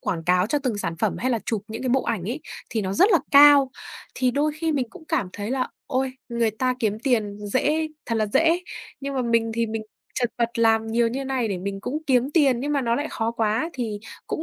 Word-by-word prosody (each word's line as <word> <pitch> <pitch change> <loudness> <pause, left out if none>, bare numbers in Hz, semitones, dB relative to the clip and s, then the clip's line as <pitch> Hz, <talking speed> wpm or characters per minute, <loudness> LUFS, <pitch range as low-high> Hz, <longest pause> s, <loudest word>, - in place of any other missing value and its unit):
quảng 165 -3 -3
cáo 180 +2 +3
cho 295 +5 +1
từng 250 -7 -2
sản 165 -4 -3
phẩm 215 -3 0
hay 255 +2 0
là 235 - +1
chụp 215 -3 -1
những 225 +3 -6
cái 255 - -1
bộ 260 +1 +2
ảnh 225 -7 -2
ấy 250 +9 -3 0.3
thì 220 - -1
nó 190 0 -2
rất 395 - +4
là 340 - +6
cao. 280 -1 +8 0.4
Thì 255 -1 +1
đôi 295 +3 +1
khi 320 0 0
mình 260 -4 0
cũng 320 - -13
cảm 185 - 0
thấy 205 +2 -5
là 260 -1 0 0.2
ôi, 260 0 -1 0.2
người 235 -1 +1
ta 255 +4 0
kiếm 215 -1 0
tiền 220 -6 0
dễ 300 +8 +1 0.2
thật 230 - -1
là 215 - +1
dễ. 330 - +3 0.4
Nhưng 275 0 -4
mà 255 - 0
mình 230 -1 +1
thì 230 0 +1
mình 220 0 -4 0.3
chật 245 -2 0
vật 235 -1 +1
làm 225 -1 +3
nhiều 230 +1 +2
như 270 +3 -3
này 260 -4 -1
để 190 -3 -2
mình 195 +1 -4
cũng 280 +8 -3
kiếm 260 +1 +2
tiền, 270 -7 +4
nhưng 290 +2 -1
mà 280 - +2
nó 235 -2 +1
lại 290 +4 -1
khó 225 0 -1
quá 225 +8 0
thì 225 -5 -3 0.3
cũng 315 - -3
240 Hz, 250 wpm, -24 LUFS, 220-275 Hz, 0.4 s, cao